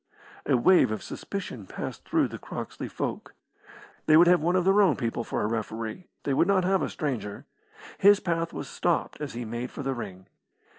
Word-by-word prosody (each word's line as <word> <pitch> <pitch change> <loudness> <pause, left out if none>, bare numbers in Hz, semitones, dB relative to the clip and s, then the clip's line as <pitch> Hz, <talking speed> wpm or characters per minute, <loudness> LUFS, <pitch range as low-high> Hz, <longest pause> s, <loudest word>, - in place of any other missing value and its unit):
A 135 - +4
wave 180 - +5
of 110 - -4
suspicion 155 - -6
passed - - -6
through - - +2
the - - -7
Croxley - - -6
folk. - - -5 0.7
They 155 - +7
would 170 - +8
have 175 -2 +5
one 175 +3 +1
of 180 -1 +2
their 195 +2 +5
own 185 -7 +4
people 115 -1 -2
for - - -2
a - - +1
referee. 110 - -4 0.2
They 140 - 0
would 165 - +3
not 195 -2 +3
have 190 +1 +2
a - - -1
stranger. 125 -9 -4 0.5
His 205 +1 +7
path 165 -3 -1
was - - -6
stopped 175 -3 -1
as 145 -3 -4
he 120 0 -5
made 120 +3 -4
for 145 - -7
the 135 0 -1
ring. 95 -6 -7
145 Hz, 200 wpm, -27 LUFS, 115-180 Hz, 0.7 s, would